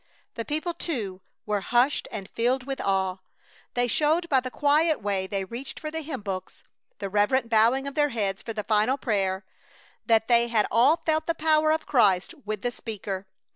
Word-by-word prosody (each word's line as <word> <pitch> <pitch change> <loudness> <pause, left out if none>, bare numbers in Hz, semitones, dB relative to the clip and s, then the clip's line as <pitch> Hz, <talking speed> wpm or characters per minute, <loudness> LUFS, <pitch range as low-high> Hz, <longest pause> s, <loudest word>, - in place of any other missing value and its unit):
The 230 - -4
people, 310 +4 -2
too, 220 - -4 0.2
were 210 -1 0
hushed 245 +7 +2
and 200 -3 -6
filled 250 +4 0
with 270 +1 -4
awe. 190 -1 0 0.6
They 245 0 +2
showed 310 +8 +1
by 270 - +4
the 255 0 -5
quiet 300 +4 +2
way 195 -2 -1
they 195 0 -2
reached 240 +7 -7
for 310 - -5
the 320 +1 -3
hymn 280 -6 -5
books, 190 -2 -6 0.3
the 200 - -4
reverent 210 +5 +1
bowing 235 +5 +3
of 280 - -5
their 295 0 +2
heads 200 -6 -2
for 230 - -6
the 215 -2 -3
final 215 +5 +2
prayer, 195 -6 -1 0.6
that 225 -1 +3
they 235 -1 +4
had 225 -3 +2
all 255 +9 +5
felt 315 -1 0
the 335 - 0
power 310 -1 +3
of 315 0 0
Christ 205 - +3
with 210 -1 -4
the 245 - 0
speaker. 200 -4 -6
235 Hz, 190 wpm, -26 LUFS, 205-290 Hz, 0.6 s, all